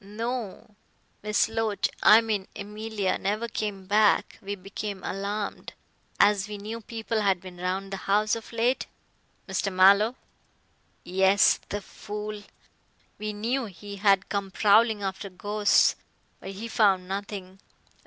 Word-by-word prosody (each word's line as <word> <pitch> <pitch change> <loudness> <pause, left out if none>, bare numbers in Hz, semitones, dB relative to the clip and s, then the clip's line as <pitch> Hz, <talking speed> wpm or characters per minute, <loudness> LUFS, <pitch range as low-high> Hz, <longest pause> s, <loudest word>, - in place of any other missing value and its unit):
"No. 220 0 -5 0.5
Miss 210 0 +2
Loach 225 -2 0
I 220 +2 +8
mean 210 -4 -2
Emilia 210 -1 -3
never 210 +4 -1
came 205 -3 -4
back. 210 +1 +2
We 200 +1 -4
became 195 0 -6
alarmed, 200 +2 -4 0.5
as 205 -1 +4
we 210 -1 -6
knew 220 +3 -6
people 225 0 -3
had 195 -3 +2
been 180 0 -11
round 190 +2 -3
the - - -2
house 210 +2 +3
of 230 - -9
late 235 +3 0 0.3
" - - -40
"Mr. 195 +1 -1
Mallow 200 +5 +5 0.5
" - - -40 0.2
"Yes, 190 +2 +4
the 205 - -3
fool. 210 +1 -7 0.8
We 215 0 -3
knew 235 +5 -1
he 200 0 -9
had 195 -1 +3
come 200 -1 -2
prowling 210 +2 +3
after 195 +1 -4
ghosts. 205 +3 +2 0.4
But 195 - -8
he 215 +4 -6
found 195 -5 +2
nothing. 195 -1 -6
205 Hz, 140 wpm, -27 LUFS, 195-215 Hz, 0.8 s, I